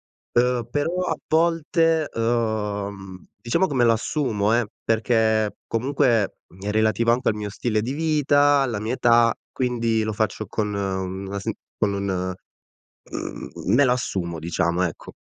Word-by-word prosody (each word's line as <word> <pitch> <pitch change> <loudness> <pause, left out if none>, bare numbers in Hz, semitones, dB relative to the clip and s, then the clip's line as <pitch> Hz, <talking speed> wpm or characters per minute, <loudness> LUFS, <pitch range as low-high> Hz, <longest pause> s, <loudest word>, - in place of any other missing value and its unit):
ehm, 120 -1 0
però, 145 +5 0 0.2
a 160 - 0
volte, 165 -1 +2
ehm, 105 -5 -2 0.2
diciamo 170 - +1
come 130 -7 +1
l'assumo, 115 -2 +1
eh, 120 -1 +2 0.2
perché 110 -1 +2
comunque 135 +5 0 0.5
è 100 +2 -3
relativo 110 +2 +2
anche 125 +2 +1
al - - -2
mio 105 -1 -4
stile 110 +2 -1
di 125 +5 -3
vita, 145 -2 +3
alla 120 -6 -1
mia 110 +3 -3
età, 120 -2 +4 0.2
quindi 115 -3 0
lo 110 0 -1
faccio 110 +1 -1
con 105 -2 -2
una 95 0 -3
sen - - -3 0.2
con 100 -1 +1
un 95 -2 -2 0.8
mhmm, - - -6 0.2
m - - +3
me 140 +3 +6
la 125 - +4
assumo, 90 -9 -2
diciamo, 85 +2 0
ecco. 85 -3 -4
115 Hz, 145 wpm, -23 LUFS, 100-130 Hz, 0.8 s, me